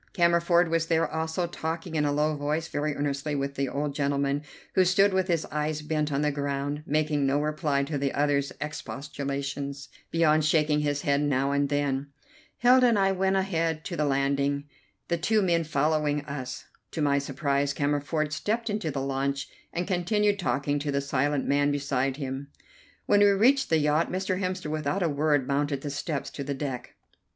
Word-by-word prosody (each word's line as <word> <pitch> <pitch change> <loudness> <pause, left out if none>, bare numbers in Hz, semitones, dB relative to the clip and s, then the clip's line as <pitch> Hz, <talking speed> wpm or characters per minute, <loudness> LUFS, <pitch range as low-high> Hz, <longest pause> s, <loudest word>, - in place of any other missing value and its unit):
Cammerford 170 -1 +4
was 165 0 +1
there 165 -1 +2
also, 160 +3 -2
talking 165 0 -4
in 150 -2 +1
a 145 - +1
low 150 +1 +1
voice 150 +3 -2
very 150 0 -2
earnestly 145 +1 -2
with 140 0 -2
the 140 -1 -1
old 145 +2 -2
gentleman, 140 0 0 0.3
who 190 - +5
stood 195 +2 +4
with 190 -1 +1
his 170 -4 0
eyes 150 0 -2
bent 150 -1 -1
on 140 0 0
the 150 - +2
ground, 140 +1 -2
making 150 -1 +1
no 140 +2 +2
reply 150 -2 0
to 145 0 -3
the 140 -1 0
other's 140 -1 +1
expostulations 140 -1 -5 0.2
beyond 155 -2 +3
shaking 150 -1 +3
his 145 -1 -1
head 140 -3 +2
now 140 -1 +1
and 140 0 +1
then. 140 -1 0 0.5
Hilda 250 +1 +6
and 230 -3 +3
I 195 -1 +3
went 190 0 +1
on 190 - +3
ahead 165 -4 -1
to 175 - -4
the 150 - 0
landing, 140 0 +1 0.4
the 170 - 0
two 215 +6 +2
men 170 -2 +2
following 150 0 +1
us. 130 -3 -6 0.3
To 160 - -2
my 140 -1 +3
surprise 140 0 0
Cammerford 145 +2 -1
stepped 225 +7 -1
into 205 -6 -2
the 140 -2 -3
launch 135 +1 -2 0.2
and 175 +1 -2
continued 205 +3 +1
talking 145 -5 0
to 145 0 -2
the 140 - +1
silent 140 0 0
man 145 0 +3
beside 135 -2 -1
him. 135 -1 -4 0.6
When 205 - +4
we 205 - +6
reached 245 +8 +4
the 160 - +4
yacht 150 +2 +2
Mr. 185 0 -1
Hemster 185 -4 -2
without 155 +5 -1
a 170 - +2
word 145 -2 +1
mounted 140 0 0
the 145 - -4
steps 140 -1 -3
to 140 - -5
the 140 0 -3
deck. 135 -3 -5
150 Hz, 185 wpm, -27 LUFS, 140-165 Hz, 0.6 s, Hilda